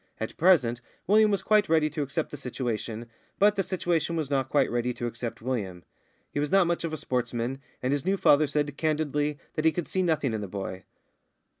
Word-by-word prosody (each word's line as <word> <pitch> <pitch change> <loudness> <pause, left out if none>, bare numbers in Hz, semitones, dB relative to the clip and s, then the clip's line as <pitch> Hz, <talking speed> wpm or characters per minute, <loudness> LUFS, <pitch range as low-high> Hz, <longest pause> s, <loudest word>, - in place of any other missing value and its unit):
At 110 - -4
present, 125 -10 +3 0.2
William 215 +3 +5
was 200 -2 0
quite 210 -4 +3
ready 160 -1 +4
to 155 - -3
accept 145 +3 -2
the - - -5
situation, 120 -3 -4 0.3
but 210 +1 +4
the 195 - +1
situation 175 -3 -1
was 155 -4 -2
not 135 -2 +1
quite 140 -2 +2
ready 120 0 -1
to 120 - -4
accept 115 -1 -5
William. 100 -9 -3 0.5
He - - -2
was 145 0 0
not 195 -1 +5
much 170 0 -1
of 165 - -2
a 155 - -3
sportsman, 125 -1 -2 0.2
and 130 +2 +1
his 145 - -1
new 195 +3 +1
father 150 -4 +5
said 145 0 -1
candidly 150 -2 0 0.2
that 155 - -2
he 160 - +5
could 170 -3 -3
see 190 - 0
nothing 155 -8 +1
in 110 - -2
the 100 - -4
boy. 95 -1 -6
145 Hz, 210 wpm, -27 LUFS, 120-165 Hz, 0.5 s, William